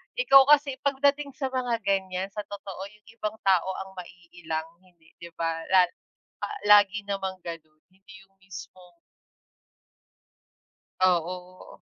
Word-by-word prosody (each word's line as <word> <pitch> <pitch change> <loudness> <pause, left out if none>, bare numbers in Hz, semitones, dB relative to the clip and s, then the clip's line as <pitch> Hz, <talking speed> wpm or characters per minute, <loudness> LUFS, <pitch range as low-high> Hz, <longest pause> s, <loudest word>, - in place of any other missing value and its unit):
ikaw 275 - +6
kasi 285 -3 +4
pagdating 280 0 0
sa 265 -2 -3
mga 245 -4 -1
ganyan, 190 -1 -1
sa 210 0 -6
totoo 200 -2 -8
yung 210 - -28
ibang 220 -1 -4
tao 190 -1 +3
ang 190 - -14
maiilang 170 -3 -7
hindi 175 -3 -26
'di 170 0 -10
ba, 165 0 -2
lal 185 -2 +5 0.8
lagi 205 0 +6
namang 195 -2 -4
gano'n, 155 -2 -9
hindi 195 +1 -18
yung 195 0 -30
mismong 180 -1 -12 2.1
Oo. 180 0 -1
190 Hz, 120 wpm, -26 LUFS, 175-215 Hz, 2.1 s, ikaw